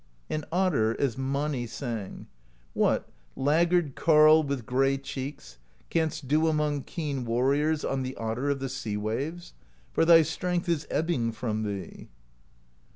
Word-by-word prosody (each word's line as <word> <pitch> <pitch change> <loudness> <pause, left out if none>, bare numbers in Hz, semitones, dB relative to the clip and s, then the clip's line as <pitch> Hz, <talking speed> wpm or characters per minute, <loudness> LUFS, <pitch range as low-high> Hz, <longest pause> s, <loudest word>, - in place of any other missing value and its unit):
And 155 -1 -2
Otter, 155 -12 +1
as 135 -5 0
Mani 135 -1 -2
sang: 115 -4 -6 0.5
What, - - +1 0.3
laggard 165 +2 +2
carle 155 +1 +6
with 140 -5 -3
gray 135 +3 +2
cheeks. 130 - -7 0.3
Canst 160 -4 -1
do 155 +4 +3
among 150 -3 0
keen 145 -6 -3
warriors 140 +6 +1
On 135 -1 -1
the 130 +1 -4
Otter 115 +5 -2
of 140 - +1
the 135 0 -4
Sea 115 -6 -4
Waves? 140 +12 -4 0.4
For - - +3
thy 165 0 +7
strength 180 +3 -2
is 165 -3 0
ebbing 150 -8 0
from 110 -2 -3
thee. 100 -5 -6
140 Hz, 140 wpm, -27 LUFS, 120-155 Hz, 0.5 s, thy